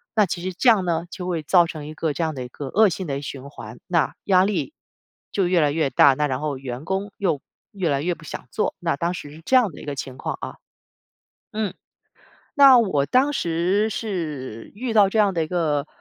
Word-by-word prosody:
那 215 - +5
其 175 -1 -4
实 185 +1 -3
这 215 +8 -1
样 215 -5 +4
呢， 170 -1 -1
就 180 0 -6
会 170 -3 -1
造 175 +2 +5
成 155 -3 -7
一 155 - -7
个 155 0 -1
这 170 - -4
样 160 -1 -2
的 130 - -4
一 - - -10
个 140 +3 -7
恶 210 +6 +4
性 180 +1 -4
的 140 -1 -3
循 140 -1 -7
环。 - - -10
那 170 -3 +1
压 185 -2 +5
力 210 - -2 0.6
就 195 -3 +1
越 175 -1 +3
来 145 -1 +3
越 150 -2 0
大， 140 - +6
那 150 +1 +1
然 130 -1 -3
后 150 -3 -2
员 130 0 -6
工 195 +3 -2
又 175 -9 0 0.3
越 190 -4 -2
来 140 -1 +1
越 175 +3 0
不 160 - -15
想 - - -7
做， - - -1
那 165 -4 -1
当 170 +4 -1
时 145 -5 -8
是 155 - -13
这 260 - +2
样 245 -7 +4
的 - - -12
一 - - -10
个 145 -1 -4
情 130 -1 -6
况 - - -4
啊。 - - -6 1.0
嗯， 215 -2 -2 0.8
那 275 -3 +8
我 170 -11 +1
当 270 +3 +3
时 180 - +1
是 155 - -5
遇 235 +2 -3
到 205 -3 +5
这 220 - 0
样 205 -2 +4
的 165 -2 0
一 - - -5
个， 155 -4 0
170 Hz, 250 characters per minute, -23 LUFS, 145-200 Hz, 1.0 s, 那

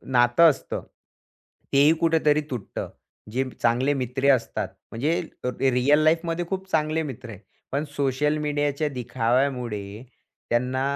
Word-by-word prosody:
नातं 120 +7 +6
असतं, 140 - -3 0.9
तेही 145 +3 +6
कुठेतरी 155 -2 +3
तुटतं. 120 -6 -5 0.4
जे 130 +4 0 0.2
चांगले 125 +4 +2
मित्र 130 +1 0
असतात 115 -4 -3 0.2
म्हणजे 135 -1 -1
रिअल 130 +4 +4
लाईफमध्ये 165 +2 +1
खूप 190 0 -4
चांगले 155 0 +1
मित्र 130 -4 -7
आहेत, 105 -3 -10 0.3
पण 140 +2 0
सोशल 145 +2 +1
मीडियाच्या 145 0 -1
दिखाव्यामुळे 120 -4 -1 0.5
त्यांना 125 +2 0
135 Hz, 115 wpm, -25 LUFS, 125-150 Hz, 0.9 s, नातं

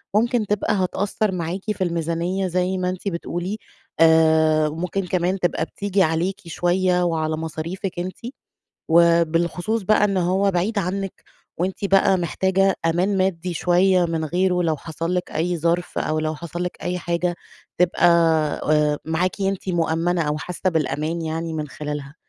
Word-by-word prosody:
ممكن 235 0 +2
تبقى 210 +2 0
هتأثّر 200 +2 0
معاكِ 180 +1 -3
في 190 -2 -2
الميزانية 170 +2 -1
زي 185 +1 0
ما 180 0 -1
أنتِ 185 +2 -5
بتقولي، 175 +2 -3 0.4
آآ، 160 -1 +5
ممكن 180 +4 -3
كمان 185 +2 0
تبقى 175 -2 0
بتيجي 200 +1 0
عليكِ 165 +4 -1
شوية 180 +2 +1
وعلى 160 -2 0
مصاريفِك 165 +4 -4
أنتِ، 185 +1 -4 0.7
وبالخصوص 170 +5 +2
بقى 210 +2 +3
إن 200 -2 +2
هو 185 +3 +2
بعيد 195 +4 0
عنِك 195 +1 -4 0.3
وأنتِ 185 +3 -2
بقى 195 0 +4
محتاجة 190 +2 +1
أمان 180 +4 +1
مادي 185 -2 -1
شوية 180 +1 +3
من 165 -1 -2
غيره، 180 +2 +1
لو 160 -3 0
حصل 165 +3 -4
لِك 180 - -3
أي 175 +2 -1
ظرف 170 +2 -1
أو 155 0 0
لو 155 0 -2
حصل 170 +2 -5
لِك 180 - -4
أي 180 0 -1
حاجة، 175 +1 -1 0.4
تبقى 180 0 +3 0.7
آآ، 150 -1 +2
معاكِ 180 +5 -1
أنتِ 195 0 -1
مؤمَّنة 170 0 +1
أو 150 0 -1
حاسّة 180 +3 -2
بالأمان 160 0 -1
يعني 160 +1 -3
من 155 -1 -3
خلالها، 145 0 -6
175 Hz, 150 wpm, -22 LUFS, 165-190 Hz, 0.7 s, آآ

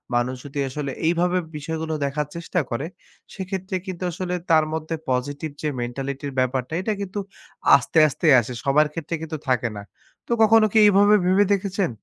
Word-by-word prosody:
মানুষ 120 +2 0
যদি 145 0 -5
আসলে 140 +1 -4 0.2
এইভাবে 175 +2 +2 0.2
বিষয়গুলো 160 +1 -4
দেখার 145 +1 -2
চেষ্টা 170 +1 -2
করে, 120 +5 -3 0.5
সেক্ষেত্রে 190 0 -4
কিন্তু 185 -1 -5
আসলে 180 +1 -4 0.2
তার 155 -1 +5
মধ্যে 160 +1 -3 0.2
positive 145 +4 -2
যে 155 - -1
mentality-র 135 +3 -4
ব্যাপারটা 130 +2 -1
এটা 215 +3 -1
কিন্তু 200 +1 -4 0.6
আস্তে, 160 - 0
আস্তে 155 +3 -2
আসে, 120 +2 -4
সবার 150 +2 +3
ক্ষেত্রে 165 +1 -4
কিন্তু 160 -1 -5
থাকে 125 -2 +1
না। - - -6 0.5
তো - - -8
কখনো 220 0 +6
কি - - +3
এইভাবে 205 +1 +6
ভেবে 190 +3 +4
দেখেছেন? 195 -1 -1
160 Hz, 165 wpm, -23 LUFS, 140-185 Hz, 0.6 s, কখনো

